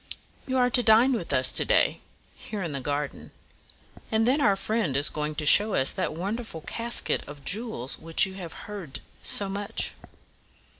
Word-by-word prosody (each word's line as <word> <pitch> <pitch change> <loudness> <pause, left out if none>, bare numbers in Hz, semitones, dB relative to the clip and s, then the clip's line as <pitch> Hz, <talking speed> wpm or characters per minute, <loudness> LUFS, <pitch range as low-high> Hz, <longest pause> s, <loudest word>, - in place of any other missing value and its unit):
"You 260 0 -1
are 250 -1 +2
to 245 - +4
dine 235 +3 +5
with 210 -11 -4
us 130 -1 +1
to - - +2
day, - - +2 0.3
here 210 -3 -6
in 170 - -4
the 140 - -4
garden; 145 +1 -4 0.8
and 220 +1 +2
then 275 +4 +2
our 200 -7 +3
friend 205 - -1
is 145 - +3
going 150 0 -4
to 150 0 -3
show 205 +7 +7
us 130 - +3
that - - -3
wonderful 200 0 -5
casket 235 +8 -1
of 145 -1 -12
jewels 200 - -2
of - - -20
which 165 +3 +3
you 190 - -9
have 180 -4 -8
heard 195 -10 -6 0.2
so 200 - +4
much." 200 +1 -3
195 Hz, 185 wpm, -26 LUFS, 150-225 Hz, 0.8 s, show